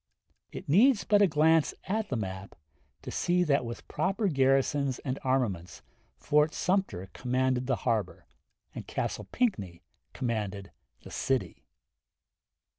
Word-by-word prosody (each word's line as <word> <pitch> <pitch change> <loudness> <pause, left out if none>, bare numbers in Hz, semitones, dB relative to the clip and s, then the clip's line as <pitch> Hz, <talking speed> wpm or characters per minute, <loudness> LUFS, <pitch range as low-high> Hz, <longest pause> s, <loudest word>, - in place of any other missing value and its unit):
It - - -8
needs 215 - +5
but 205 -1 +3
a 200 - +6
glance 160 0 +3
at 215 +2 -2
the 130 - -1
map 95 -3 -5 0.5
to - - -6
see 180 0 +1
that 140 -5 +2
with 120 -1 -7
proper 195 +2 0
garrisons 135 -1 +2
and 130 -1 -4
armaments 120 -10 -1 0.3
Fort 150 +1 +2
Sumter 180 - -1
commanded 130 0 0
the 130 - +2
harbor. 110 -6 -1 0.5
and - - -8
Castle - - -3
Pinckney 100 - -1 0.3
commanded 105 -5 -3 0.3
the - - -11
city. 135 -1 -2
135 Hz, 125 wpm, -29 LUFS, 115-175 Hz, 0.5 s, a